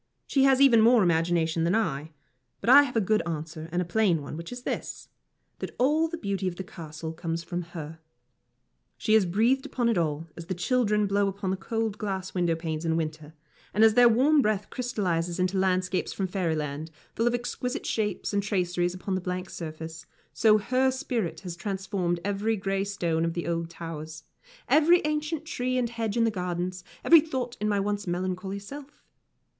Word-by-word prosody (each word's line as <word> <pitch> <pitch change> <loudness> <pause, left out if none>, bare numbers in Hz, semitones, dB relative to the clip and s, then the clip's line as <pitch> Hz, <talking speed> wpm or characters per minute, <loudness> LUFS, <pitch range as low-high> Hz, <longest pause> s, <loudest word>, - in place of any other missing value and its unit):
She 270 -1 +3
has 265 -1 +5
even 255 -5 +7
more 230 -1 +6
imagination 165 -1 +1
than 170 +5 +2
I. 160 -9 -1 0.5
But 235 - +2
I 285 +2 +10
have 275 -4 -3
a - - +4
good 215 +2 +2
answer 160 0 -5
and 175 +1 0
a - - -9
plain 180 -2 +2
one, 140 - -7
which 170 +5 -7
is 245 0 -7
this - - -5 0.5
that - - -6
all 300 +6 +3
the 335 +1 -5
beauty 200 - -2
of 180 - -2
the 190 - -5
Castle 160 -3 -7
comes 165 0 -4
from 175 +1 -3
her. 165 -2 -8 1.0
She 215 - +1
has 215 -4 +5
breathed 230 +9 +2
upon 245 -4 -1
it 220 -6 +2
all, 155 -1 -1
as 170 -1 -9
the 185 - -2
children 210 +2 +1
blow 200 0 +2
upon 195 -1 -3
the - - +1
cold 225 +1 -3
glass 190 -3 -3
window 175 -2 +1
panes 160 -1 -4
in 165 -1 +1
winter; 155 -1 -4 0.4
and 215 - +5
as 220 -1 +7
their 245 +1 +7
warm 280 +6 +4
breath 210 -3 -1
crystallises 180 -9 -1
into 185 +1 +1
landscapes 185 0 0
from 195 - -2
fairyland, 160 -5 -2 0.3
full 230 - +1
of 240 - +2
exquisite 245 +1 -3
shapes 210 -2 -2
and 200 - +2
traceries 180 -3 0
upon 190 +1 -4
the 185 - -1
blank 180 +1 -4
surface, 160 -1 -7 0.3
so 215 -1 +5
her 255 +5 +2
spirit 240 -8 -2
has 180 -3 -6
transformed 190 -2 -2
every 205 +2 0
grey 195 0 -1
stone 170 -5 -1
of 165 0 -1
the 170 - -3
old 170 -1 -2
towers, 160 -2 -7 0.4
every 335 +3 +5
ancient 305 +1 -2
tree 255 -5 -2
and 240 -2 0
hedge 225 -2 -2
in 230 - +4
the 225 - +2
gardens, 180 -1 -3 0.2
every 330 -2 +8
thought 260 -6 -4
in 210 - +1
my 205 -1 +1
once 205 0 -2
melancholy 185 +2 -2
self. 280 +8 -10
190 Hz, 195 wpm, -27 LUFS, 170-230 Hz, 1.0 s, I